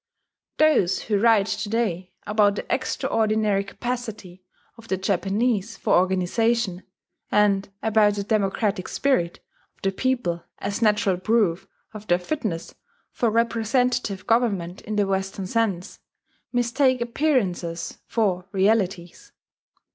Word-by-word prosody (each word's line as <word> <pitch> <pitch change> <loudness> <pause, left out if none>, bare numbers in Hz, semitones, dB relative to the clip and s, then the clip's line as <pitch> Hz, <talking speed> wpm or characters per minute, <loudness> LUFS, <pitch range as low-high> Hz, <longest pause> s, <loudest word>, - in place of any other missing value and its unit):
Those 305 - +3
who 210 -2 0
write 220 -2 +4
to 210 - -3
day 190 -6 -1
about 205 -1 +3
the - - -5
extraordinary 215 -2 0
capacity 215 -4 -6 0.3
of 230 0 -15
the 190 - 0
Japanese 200 +3 0
for - - 0
organization, 190 +2 +1 0.5
and 200 -2 +3
about 215 -2 +3
the 200 - -2
"democratic 200 -2 0
spirit" 215 -12 0 0.3
of - - -35
the 195 - +2
people 225 -7 -1
as 200 +3 -4
natural 210 -4 +2
proof 195 -3 +1 0.3
of 215 0 -10
their 175 - +4
fitness 180 - -4 0.4
for 235 - 0
representative 230 -2 0
government 205 -7 0
in 215 - -5
the 205 -1 +2
Western 195 0 -2
sense, 195 -3 -1 0.5
mistake 250 +2 +2
appearances 230 - -1
for 190 -5 0
realities. 195 -3 0
210 Hz, 115 wpm, -24 LUFS, 190-230 Hz, 0.5 s, write